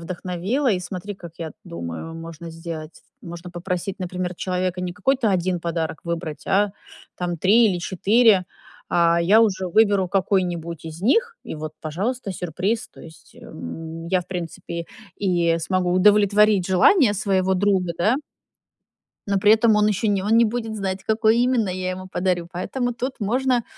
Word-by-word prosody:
вдохновила, 185 - -2
и 190 - +1
смотри, 185 +3 -6
как 170 -3 -11
я 165 -2 -5
думаю, 85 - -6
можно 165 0 -8
сделать. 165 -1 -8 0.2
Можно 175 -3 -9
попросить, 180 +2 -4
например, 180 -1 -4
человека 185 -1 -2
не 180 -1 -3
какой-то 235 +3 +1
1 180 -1 0
подарок 165 -2 -3
выбрать, 170 -2 -5
а 200 +1 +2 0.5
там 175 -1 -2
3 215 +8 +5
или 180 -4 0
4, 200 +2 +3 0.5
а 170 0 +3
я 200 +7 +5
уже 190 -4 0
выберу 200 -1 +3
какой-нибудь 175 -4 -1
из 160 +2 -8
них- 460 - +2
и - - -6
вот, 155 0 -6
пожалуйста, 200 +8 -3
сюрприз. 185 +5 -2
То - - -16
есть, 160 -1 -15
эм, 160 - -8
я, 185 +1 +1
в 175 - -12
принципе, 170 -1 -5 0.3
и 175 -4 +1
смогу 180 +1 0
удовлетворить 205 0 +4
желания 205 - +5
своего 190 -2 +1
друга, 185 -2 +1
да 215 +8 +3 1.1
но 200 -1 +1
при 205 +2 +5
этом 225 0 +4
он 210 0 +4
еще 210 +1 0
не 200 -2 +1
он 220 +3 +2
не 235 - +6
будет 225 -1 -3
знать, 195 -1 -3
какой 220 +1 +3
именно 245 -4 +2
я 185 0 -2
ему 185 0 -6
подарю. 180 -2 -1
Поэтому 245 +7 -3
тут 255 +2 -4
можно 245 +3 +1
185 Hz, 160 wpm, -22 LUFS, 170-210 Hz, 1.1 s, не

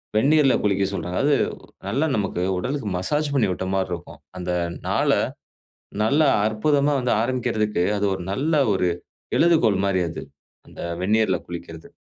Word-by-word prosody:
வெந்நீர்ல 140 +3 +4
குளிக்க 100 -1 +2
சொல்றாங்க. 90 -2 -4
அது 145 0 +4 0.5
நல்ல 135 +9 0
நமக்கு 95 -4 -1 0.2
உடலுக்கு 125 +4 -3
மசாஜ் 145 +11 -1
பண்ணி 125 -7 +3
விட்ட 95 +1 -3
மாரி 95 -1 0
இருக்கும். 85 0 -8 0.2
அந்த 90 0 -3 0.4
நாள - - +1 0.9
நல்லா 145 +6 +3 0.2
அற்புதமா 140 +7 +2
வந்து 125 -1 +1
ஆரம்பிக்கிறதுக்கு 115 -6 0
அது 100 - 0
ஒரு 95 - -4
நல்ல 150 +10 -1 0.2
ஒரு 90 -2 +1 0.5
எழுதுகோள் 155 - +4
மாரி 95 -2 +1
அது. - - -6 0.4
அந்த - - -11 0.2
வெந்நீர்ல 105 -1 +2
குளிக்கிறது. 85 -2 -8
110 Hz, 140 wpm, -23 LUFS, 95-140 Hz, 0.9 s, வெந்நீர்ல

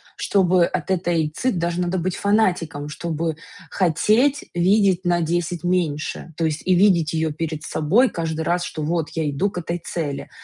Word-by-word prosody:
чтобы 185 -3 +3
от - - -4
этой 170 -4 +1
ци 250 +12 -1
даже 170 -3 -2
надо 180 +1 -1
быть 180 +2 -2
фанатиком, 175 -9 0
чтобы 160 0 -3 0.3
хотеть 215 - +2
видеть 190 +1 +3
на 175 -1 +2
10 170 0 -1
меньше, 170 -2 -2
то 165 - -1
есть 155 -1 -2
и 185 - +3
видеть 175 -4 +3
её 160 -1 0
перед 160 0 -4
собой 180 - +2
каждый 160 -2 -3
раз, 175 +2 0
что 155 - -5
вот 160 +1 -1
я 160 -2 -1
иду 165 +8 -1
к 180 - -4
этой 170 0 -3
цели. 160 -4 -4
170 Hz, 175 wpm, -22 LUFS, 160-185 Hz, 0.3 s, чтобы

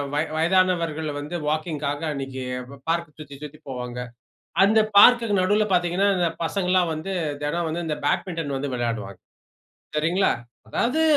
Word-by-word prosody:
வய 150 - +2
வயதானவர்கள் 165 -3 +2
வந்து 150 +4 -5
வாக்கிங்‌க்காக, 150 -2 -2
அன்னக்கி 135 -2 -5 0.3
ப 140 - -12
பார்க்க 170 -2 -3
சுத்தி, 145 -2 -9
சுத்தி 150 +1 -9
போவாங்க. 125 -1 -5 0.7
அந்த 220 +2 +4 0.2
பார்குக்கு 230 -3 +7
நடுவுல 210 +3 +3
பாத்தீங்கன்னா, 180 +3 +2
இந்த 175 -2 +2
பசங்கள்லாம் 180 -1 +1
வந்து, 160 +5 -4 0.3
தெனம் 165 +3 -1
வந்து, 170 +1 -3
இந்த 150 - -2
பேட்மிட்டன் 165 -2 -1
வந்து 135 -1 -3
விளையாடுவாங்க. 110 -6 -3 0.8
சரிங்களா. 170 +6 +2 0.4
அதாவது 260 - +1
160 Hz, 135 wpm, -24 LUFS, 145-185 Hz, 0.8 s, பார்குக்கு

